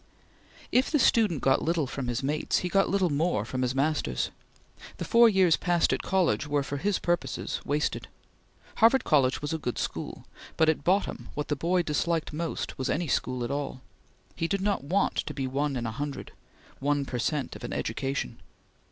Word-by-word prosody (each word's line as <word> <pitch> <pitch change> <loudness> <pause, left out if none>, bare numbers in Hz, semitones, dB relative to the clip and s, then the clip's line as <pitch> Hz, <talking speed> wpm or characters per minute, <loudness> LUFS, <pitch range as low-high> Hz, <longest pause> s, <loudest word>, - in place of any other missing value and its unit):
If 255 +2 +3
the 305 - +2
student 215 - +3
got 135 - +3
little 165 -2 +1
from 135 -1 -5
his 120 +2 -2
mates, 150 +3 0
he - - -1
got 195 +2 +3
little 190 -4 +2
more 145 - +1
from 130 +2 -3
his 125 0 0
masters. 140 - 0 0.7
The - - -4
four 235 0 +6
years 190 -5 +4
passed 175 -2 +2
at - - -1
college 180 -6 +1
were, 145 -1 +1
for 140 +1 -4
his 200 +7 0
purposes, 175 0 -2
wasted. 150 +1 -1 0.7
Harvard 230 +4 +5
College 135 -3 +2
was 150 - -2
a 160 - -2
good 125 -5 -3
school, - - -4 0.3
but 160 -1 +4
at 155 -2 0
bottom 190 +5 0
what 150 - -3
the 145 - +1
boy 175 +5 +1
disliked 160 +1 -1
most 165 -2 -4
was 130 - -1
any 170 +1 0
school 125 -2 -1
at 120 - -3
all. 140 -2 -3 0.5
He 165 - -1
did 195 +2 -1
not 200 -7 0
want 185 +8 +1
to 150 - -2
be 135 - -2
one 140 +2 -1
in 120 -2 -2
a 115 - -2
hundred 140 +4 -5 0.5
one 145 0 +1
per 125 -2 -4
cent 145 +3 -1
of - - -10
an - - -5
education. 135 - -3
150 Hz, 195 wpm, -28 LUFS, 135-175 Hz, 0.7 s, four